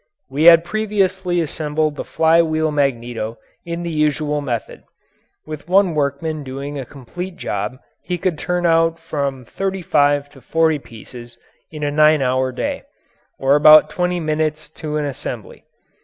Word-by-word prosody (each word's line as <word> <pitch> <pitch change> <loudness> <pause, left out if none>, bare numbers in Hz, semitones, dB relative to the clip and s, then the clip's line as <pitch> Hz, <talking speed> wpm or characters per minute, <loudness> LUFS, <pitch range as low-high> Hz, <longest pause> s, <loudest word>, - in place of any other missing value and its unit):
We 145 +4 0
had 165 -1 +9
previously 190 -4 0
assembled 155 -1 -1
the - - -4
fly 165 +1 +3
wheel 155 -1 0
magneto 120 -5 -2 0.3
in 170 0 -4
the 170 - -3
usual 150 -1 0
method. 120 -5 -4 0.6
With 155 0 -8
one 190 -2 +4
workman 150 +1 -2
doing 140 +2 -6
a 130 - -6
complete 175 +8 -7
job 105 - -4 0.2
he 180 -1 -3
could 170 -3 -2
turn 180 0 -1
out 165 0 +3
from 140 -6 -4
thirty 195 +6 -3
five 145 -2 +2
to 135 -2 -16
forty 160 0 +1
pieces 120 0 -12 0.3
in 155 -1 -7
a 145 - 0
nine 155 -1 +4
hour 130 0 +1
day, - - -3 0.6
or 135 +1 +3
about 155 +1 +7
twenty 180 0 -1
minutes 155 -1 -2
to 150 -1 -5
an 150 - -1
assembly. 140 -3 -7
155 Hz, 155 wpm, -19 LUFS, 140-165 Hz, 0.6 s, had